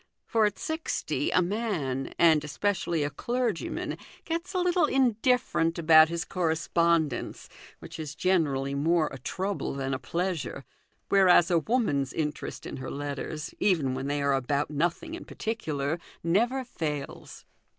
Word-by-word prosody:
For 225 -2 +2
at 205 - -5
sixty 315 +1 -2
a 180 - +3
man, 175 - -2
and 160 -3 +5
especially 170 0 -1
a 145 - -2
clergyman, 235 - -2 0.3
gets 335 +3 -3
a - - +2
little 355 -2 +3
indifferent 245 - +2
about 160 -1 +7
his 170 0 -2
correspondence, 165 -4 0 0.3
which - - -10
is 155 -2 -5
generally 145 -7 +1
more 155 +2 +2
a 135 - -8
trouble 190 +5 -3
than 135 -1 -2
a 130 - -2
pleasure; 170 -7 -3 0.4
whereas 185 -3 +5
a 170 - +4
woman's 155 - 0
interest 150 -2 -4
in - - -6
her 130 0 -6
letters, 145 +2 -5
even 155 -10 +2
when 130 +1 -3
they 145 0 -1
are 140 0 +2
about 140 +3 0
nothing 175 - -1
in 340 - -6
particular, 155 -8 -3 0.2
never 235 +10 +2
fails. 150 - -5
165 Hz, 140 wpm, -28 LUFS, 145-205 Hz, 0.4 s, about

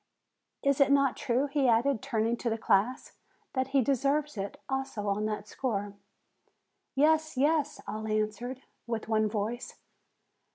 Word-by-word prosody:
Is 280 0 +3
it 275 0 +5
not 275 -2 +4
true," 260 0 +1
he 280 -2 +1
added, 240 +1 +3
turning 230 -2 0
to 235 - -2
the 225 - -1
class, 225 +3 +1 0.4
"that 260 -1 0
he 270 -1 +3
deserves 280 +3 +1
it 200 -1 -5
also 265 -6 -3
on 205 +2 0
that 210 -1 -4
score?" 205 -4 -2 1.0
"Yes, 315 +1 +3
yes 295 +1 +2
!" - - -29
all 220 0 -4
answered, 215 +5 -2 0.2
with 230 -2 -3
one 215 -1 +2
voice. 220 +3 -3
245 Hz, 150 wpm, -30 LUFS, 215-275 Hz, 1.0 s, it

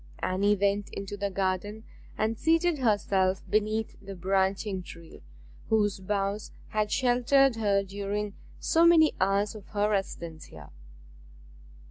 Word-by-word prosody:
Anne 200 +3 +1
went 200 0 +1
into 200 0 -6
the 200 0 -2
garden 195 +3 -2 0.3
and 220 +1 0
seated 330 +3 +2
herself 195 -5 +1
beneath 215 +1 0
the 195 0 -8
branching 190 +1 0
tree 170 -2 -12 0.5
whose 210 -3 +2
boughs 200 +1 -2 0.2
had 215 -1 0
sheltered 255 0 +3
her 200 -3 +2
during 200 +1 -4 0.3
so 330 0 +2
many 330 -2 +6
hours 200 +2 +1
of 210 -3 -11
her 210 0 0
residence 170 -5 -3
here. - - -13
205 Hz, 125 wpm, -28 LUFS, 195-220 Hz, 0.5 s, many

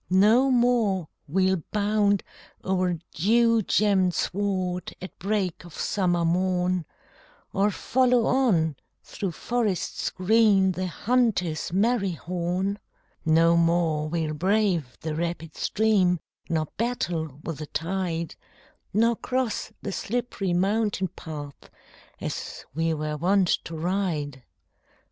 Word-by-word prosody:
No 215 +8 +5
more 235 -9 +2 0.2
we'll 190 +3 +2
bound 205 -1 +2 0.4
o'er 185 -2 +1 0.2
dew 230 +6 +3
gemmed 190 -3 +2
sward 185 -2 -1
At 185 - -9
break 195 -3 -1
of 175 -2 -12
summer 175 -4 +1
morn, 180 0 +1 0.7
Or 200 +2 +3
follow 250 +3 +2
on, 175 - +2 0.3
through 190 -4 -4
forests 225 -2 -1
green, 195 -1 +4
The 185 0 -3
hunter's 200 -7 0
merry 200 0 +2
horn; 180 +4 -2 0.5
No 165 +1 +5
more 165 -2 +2
we'll 160 -2 -1
brave 180 -5 +1
the 160 -1 -3
rapid 165 -1 -3
stream, 195 -5 +2 0.3
Nor 160 -2 +1
battle 170 - -2
with 165 -3 -5
the 155 - -6
tide, 170 0 -2 0.6
Nor 230 +2 +4
cross 255 -1 -2
the 200 - -3
slipp'ry 215 -3 -2
mountain 195 0 +1
path, 150 -4 -9 0.5
As - - -5
we 165 +2 0
were 150 0 -3
wont 185 +3 +2 0.2
to 165 - -6
ride. 160 -6 -2
185 Hz, 110 wpm, -26 LUFS, 165-210 Hz, 0.7 s, No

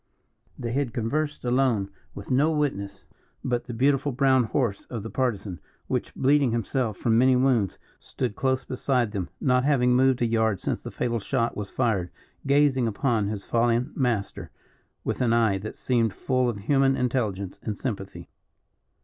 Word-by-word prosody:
They 115 - -4
had 130 -2 -1
conversed 145 +5 -2
alone, 120 -6 +1 0.2
with 100 +6 -8
no 140 +5 +4
witness 100 -11 -2 0.4
but 120 -2 -1
the 120 - -6
beautiful 140 +3 +2
brown 130 -1 +3
horse 110 -3 -1
of 115 -5 -6
the 115 - -6
Partisan, 105 - -2 0.3
which, - - -2
bleeding 140 0 +3
himself, 115 -2 -1
from 115 -1 +2
many 130 +1 +5
wounds, 125 -7 +2 0.2
stood 105 - -4
close 130 0 0
beside 125 -3 0
them, 95 -4 -3
not 125 -2 +2
having 125 -3 +3
moved 130 -1 +3
a - - +4
yard 110 -4 +1
since - - -2
the - - -7
fatal 120 -1 -2
shot 115 +2 -1
was 105 -1 -5
fired, 105 -8 0 0.4
gazing 140 -3 +3
upon 110 -1 0
his 100 -1 -4
fallen 120 +4 +1
master 120 -8 -1 0.5
with - - -2
an 120 -2 +3
eye 110 -4 +3
that 110 +3 -7
seemed 115 -5 0
full 130 -2 +1
of 115 - -3
human 135 +4 +3
intelligence 110 -7 -2
and 105 -2 -4
sympathy. 100 -7 -5
120 Hz, 165 wpm, -26 LUFS, 110-130 Hz, 0.5 s, many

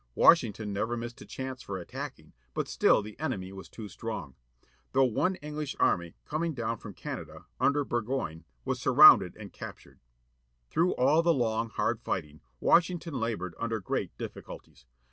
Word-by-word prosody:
Washington 110 - +4
never 115 +4 -1
missed 120 0 -6
a - - -11
chance 130 -1 -5
for 100 -4 -5
attacking, 90 - -8 0.2
but - - -1
still 110 - +3
the 105 +3 -10
enemy 100 -12 -3
was 95 -1 -10
too 110 -2 -8
strong. 105 - -6 0.6
Though 135 - +5
one 155 - +1
English 150 -2 -4
army, 85 -2 +2
coming 160 +1 -2
down 115 -1 -2
from 105 -4 -9
Canada, - - -7
under 140 +1 +2
Burgoyne, 115 -10 -2 0.2
was - - -1
surroimded - - +8
and - - -10
captured. - - -10 0.7
Through 170 +3 +2
all 140 +6 +4
the 170 -1 +3
long, 115 -2 0
hard 115 0 0
fighting, 75 -9 -4 0.2
Washington 170 -3 +2
laboured 105 -7 -2
under 115 -1 -1
great 95 - -3
difficulties. - - -9
115 Hz, 155 wpm, -29 LUFS, 100-140 Hz, 0.7 s, surroimded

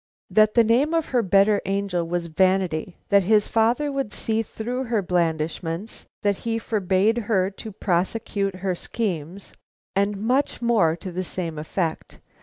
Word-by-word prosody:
"That 215 0 +4
the 235 - +6
name 260 +9 +2
of 325 -2 0
her 250 -2 +2
better 200 +1 +3
angel 195 -3 -1
was 175 0 -2
Vanity; 185 0 0
that 200 0 +5
his 210 +2 +3
father 240 +6 +2
would 275 -6 -2
see 220 +1 -1
through 245 +4 -4
her 225 -4 0
blandishments; 165 +2 -2 0.2
that 200 -2 +2
he 230 -1 -2
forbade 210 0 +1
her 190 -3 +2
to 215 +2 -8
prosecute 195 +1 -1
her 185 0 -2
schemes; 180 -2 -4 0.4
and 200 +1 +1
much 250 +7 0
more 220 -9 +3
to 180 +2 -8
the 185 +2 -3
same 170 -3 -4
effect. 160 +1 -3
200 Hz, 155 wpm, -24 LUFS, 180-225 Hz, 0.4 s, the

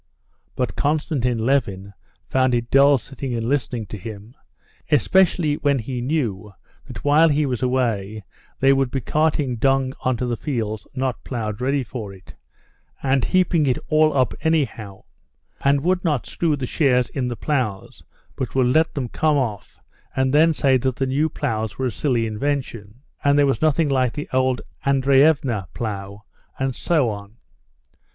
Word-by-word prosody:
But 125 - -2
Konstantin 145 -5 0
Levin 100 -7 0 0.3
found 130 -1 +2
it 120 0 -3
dull 140 +1 +6
sitting 135 0 -6
and 115 -1 -2
listening 125 -3 -1
to 105 - -8
him, 105 +3 -9 0.6
especially 160 - +3
when 140 -1 +1
he 125 +1 -4
knew 115 -8 -2 0.3
that - - -9
while 155 +3 +5
he 150 0 +2
was 125 -4 -2
away 110 -5 -1 0.4
they 135 +1 +5
would 135 -1 +1
be 135 - -2
carting 150 -1 0
dung 135 +2 +1
onto 125 -1 0
the 120 - -1
fields 110 -7 -4
not 130 -4 -2
ploughed 110 -3 -4
ready 135 +1 +1
for 110 -4 -7
it, 95 -1 -14 0.7
and 135 -2 +2
heaping 175 -5 +2
it 125 - +2
all 155 -1 +3
up 130 -3 +2
anyhow; 130 -11 -1 0.6
and 140 0 +3
would 180 +3 +1
not 150 -8 0
screw 165 -3 0
the 135 -3 -4
shares 125 -3 +1
in 130 -3 -2
the 120 - -3
ploughs, 120 -6 -3 0.3
but 130 -3 -4
would 125 -1 +3
let 160 +1 +2
them 135 -4 -2
come 150 +5 +1
off 105 - -4 0.4
and 130 0 +1
then 160 +3 +5
say 135 -4 +3
that 130 0 -1
the 135 - -1
new 140 +4 +1
ploughs 110 -6 -3
were 130 - -1
a 125 - 0
silly 120 -1 0
invention, 115 -1 -4 0.2
and 145 0 +3
there 145 - +5
was 135 - 0
nothing 155 0 +2
like 130 -3 +1
the 150 - -5
old 130 -1 +1 0.2
Andreevna 135 - +3
plough, 100 -2 -5 0.3
and 135 -2 -2
so 150 -9 +1
on. 100 +2 -9
130 Hz, 165 wpm, -22 LUFS, 115-145 Hz, 0.7 s, dull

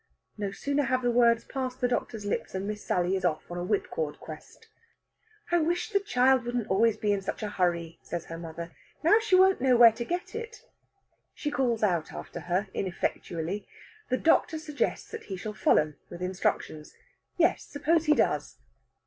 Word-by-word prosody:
No 205 -2 -3
sooner 280 +8 -1
have 255 0 0
the 245 - +2
words 235 -1 +4
passed 260 -1 -4
the 250 - +2
doctor's 225 -3 -2
lips 205 - -2
than 190 +1 -3
Miss 210 0 -4
Sally 180 +1 +1
is 190 - -3
off 170 -1 -1
on 175 - -4
a - - -3
whipcord 160 -6 -2
quest. 155 -1 -11 0.8
"I 345 - +4
wish 345 +6 0
the 400 - +3
child 260 -9 +3
wouldn't 240 -2 -2
always 220 +3 +3
be 210 -1 +1
in 200 - -1
such 195 - -4
a 210 - -2
hurry," 170 -3 -1
says 170 -1 -5
her 165 0 -7
mother. 170 0 -7 0.3
"Now 415 +8 +6
she 440 -4 +2
won't 380 -4 +5
know 255 -2 +4
where 235 -1 +9
to 225 +2 -5
get 350 +8 -4
it." 460 +1 -7 0.7
She 295 - -3
calls 240 -6 0
after 175 -2 -1
her 180 +5 -1
ineffectually. 180 0 -3 0.4
The 255 - +2
doctor 320 +1 +3
suggests 305 -2 -2
that 450 - -7
he 190 - -5
shall 210 +4 -5
follow 155 -6 +3 0.2
with 175 - -7
instructions. 180 -4 -2 0.4
Yes, - - +3
suppose 320 +3 +1
he 300 -1 +5
does? - - 0
220 Hz, 185 wpm, -28 LUFS, 180-280 Hz, 0.8 s, where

